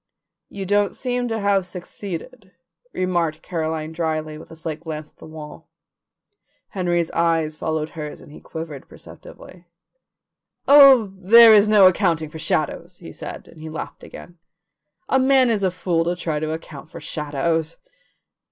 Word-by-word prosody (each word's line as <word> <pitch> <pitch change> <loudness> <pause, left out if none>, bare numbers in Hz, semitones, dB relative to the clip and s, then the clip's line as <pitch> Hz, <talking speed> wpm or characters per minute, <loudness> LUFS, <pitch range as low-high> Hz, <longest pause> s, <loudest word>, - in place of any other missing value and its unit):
"You 195 -1 -6
don't 205 +1 +1
seem 245 -1 -2
to 225 -1 -2
have 200 -1 +2
succeeded," 185 +3 -8 0.4
remarked 175 -5 -1
Caroline 160 -2 -3
dryly, 155 -2 -3
with 155 - -12
a - - -11
slight 160 -1 -6
glance 155 -2 -7
at - - -46
the - - -13
wall. 155 -1 -11 1.0
Henry's 175 -3 -1
eyes 165 -2 0
followed 155 0 -3
hers 150 -2 -7
and - - -15
he - - -12
quivered 160 -4 -8
perceptibly. 180 -1 -14 1.0
"Oh, 270 -8 +7
there 220 +4 +7
is 210 0 +6
no 210 -2 +6
accounting 170 -4 +2
for 160 - -9
shadows," 160 -2 -2
he - - -11
said, - - -9
and 155 - -15
he 160 - -7
laughed 155 - -8
again. 175 -1 -12 0.7
"A 265 - +2
man 260 -2 +4
is 215 -3 0
a 190 - +2
fool 175 -2 -1
to 175 +1 -1
try 160 -4 -3
to 155 0 -3
account 155 -1 -8
for - - -10
shadows." 160 +2 -2
170 Hz, 155 wpm, -21 LUFS, 155-200 Hz, 1.0 s, Oh